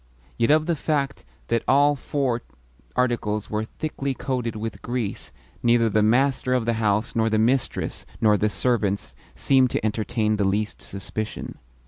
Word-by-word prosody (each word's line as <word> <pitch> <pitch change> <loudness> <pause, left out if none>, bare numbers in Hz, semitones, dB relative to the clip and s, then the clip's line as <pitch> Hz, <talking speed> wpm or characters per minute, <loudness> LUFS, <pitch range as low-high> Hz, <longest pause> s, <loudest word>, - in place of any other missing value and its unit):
Yet 115 - +1
of 155 +1 +4
the 170 0 +1
fact 140 -2 -1 0.3
that 115 -1 +2
all 145 +2 +5
four 130 -3 -1 0.5
articles 110 -4 0
were 105 +1 -1
thickly 140 +1 -4
coated 125 -5 -2
with 110 +1 -5
grease 120 -4 -3 0.3
neither 115 -1 +3
the 110 - +3
master 130 +3 +2
of 125 -3 0
the 115 - +2
house 105 +3 +1
nor 115 -1 +2
the 110 - +2
mistress 120 +4 0
nor 105 -1 +4
the 105 +1 +1
servants 100 - 0 0.2
seemed 130 -2 +4
to 110 - -2
entertain 110 0 0
the 105 - +1
least 105 +2 -1
suspicion. 105 +3 -6
115 Hz, 155 wpm, -24 LUFS, 105-130 Hz, 0.5 s, all